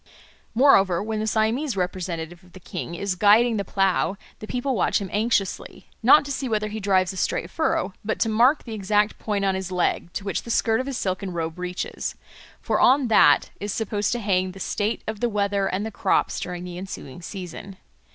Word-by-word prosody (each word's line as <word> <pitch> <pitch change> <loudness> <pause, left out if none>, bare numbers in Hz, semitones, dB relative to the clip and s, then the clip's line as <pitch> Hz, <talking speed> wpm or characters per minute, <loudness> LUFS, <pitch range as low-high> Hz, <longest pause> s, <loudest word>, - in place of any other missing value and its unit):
Moreover, 200 -9 +5
when 220 0 -3
the 215 - -2
Siamese 225 +4 0
representative 175 -2 -4
of 180 - -21
the 185 - -11
king 175 -2 -6
is 200 +2 -2
guiding 215 +5 +4
the 200 - -1
plough, 195 -1 +1 0.2
the 215 - -8
people 250 +3 -1
watch 205 - +1
him 195 -2 -6
anxiously, 210 -2 -1
not 275 +6 +6
to 285 - -5
see 265 -1 -3
whether 215 -1 0
he 215 +1 -5
drives 190 -2 +2
a - - -9
straight - - -1
furrow, 320 - 0
but 220 - -2
to - - +3
mark 240 +7 +3
the 230 - -7
exact 210 +1 +1
point 205 -2 -1
on 195 - +2
his 190 0 -4
leg 175 -1 0
to - - -4
which 195 - -2
the - - -11
skirt 225 -1 +2
of 260 - -3
his 270 -3 -3
silken 185 0 -2
robe 165 0 -4
reaches; 180 0 -4 0.4
for - - 0
on 260 -1 +4
that 145 -9 +5
is 205 0 -3
supposed 210 -1 -1
to 240 - -2
hang 185 -3 0
the 195 - -11
state 210 +3 -2
of 220 -1 -4
the 240 - +1
weather 200 -2 0
and 195 +3 -2
the 220 - -4
crops - - 0
during 180 0 -5
the 180 -1 -7
ensuing 180 -5 -8
season. 190 +1 -8
200 Hz, 210 wpm, -24 LUFS, 185-220 Hz, 0.4 s, not